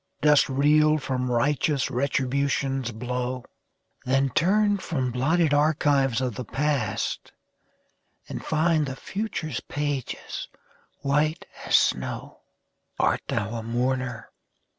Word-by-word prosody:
Dost 150 -1 +5
reel 150 +3 +4
from 130 -3 -2
righteous 140 +3 +1
Retribution's 135 0 0
blow? 125 +2 -3 0.6
Then 135 +1 +1
turn 205 - +3
from 130 -9 -2
blotted 150 +5 +2
archives 145 -4 +2
of 125 -3 -1
the 125 - -5
past, 135 -5 -2 0.9
And - - -6
find 155 -1 +2
the 130 - -4
future's 175 - -4
pages 145 -3 -4 0.5
white 150 +3 +1 0.2
as - - +4
snow. - - 0 0.6
Art - - +2
thou 105 +1 -1
a 115 - -3
mourner? 125 0 -2
135 Hz, 105 wpm, -25 LUFS, 125-150 Hz, 0.9 s, Dost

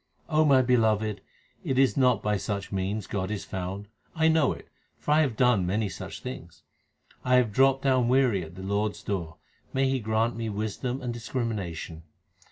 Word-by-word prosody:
my 150 -4 +5
beloved, 110 -4 +2 0.4
it 130 - -1
is 135 -1 +4
not 125 -6 +3
by 105 0 +1
such 100 -1 -3
means 100 +1 -2
God 95 -2 -3
is 105 -2 -4
found; 95 +2 -5 0.3
I 160 0 +3
know 160 -4 +3
it, - - -8 0.3
for - - -3
I 155 +1 +5
have 130 -8 0
done 125 -6 +4
many 105 +2 0
such 95 0 -8
things. 85 -10 -8 0.6
1 125 - 0
have 120 -4 +2
dropped 135 +4 +3
down 130 -3 +3
weary 125 -6 +3
at 80 +2 -11
the 95 - -8
Lord 100 +2 0
s - - -13
door: 85 -5 -3 0.4
may 135 0 +2
He 130 0 +1
grant 110 +1 0
me 115 -1 -3
wisdom 110 +5 -3
and 120 -1 -2
discrimination 110 -9 -4
110 Hz, 180 wpm, -27 LUFS, 100-130 Hz, 0.6 s, my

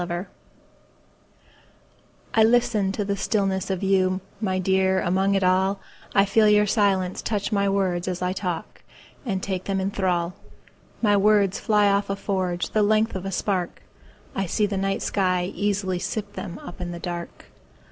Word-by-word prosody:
Listening 175 +1 -3 2.1
I 225 - +5
LISTEN 220 -4 +3
to 205 0 -2
the 200 0 -1
stillness 195 -1 -1
of 190 0 -2
you, 185 -1 +2 0.2
My 190 -3 0
dear, 190 0 +2
among 190 +3 +1
it 195 - +1
all;I 190 +2 +1
feel 210 +2 +4
your 210 0 +5
silence 195 -4 +1
touch 210 -1 -2
my 200 -1 +2
words 190 -3 0
as 180 -1 -2
I 180 0 -1
talk, 180 -4 -5 0.5
And 190 -4 -2
take 185 -2 -3
them 195 -1 -1
in 190 +1 -1
thrall.My 185 +3 -2
words 205 -1 +3
fly 210 -2 +3
off 200 0 +1
a 195 - 0
forgeThe 190 0 -1
length 215 +2 +2
of 190 0 -4
a - - -3
spark;I 190 0 -4
see 210 +5 +1
the 200 -1 -3
night 195 0 -1
sky 185 -2 0
easily 200 -3 -1
sip 205 +2 -4
themUp 180 -1 -8
in 175 -1 -4
the - - -6
dark. 175 -1 -6
195 Hz, 155 wpm, -24 LUFS, 185-205 Hz, 2.1 s, I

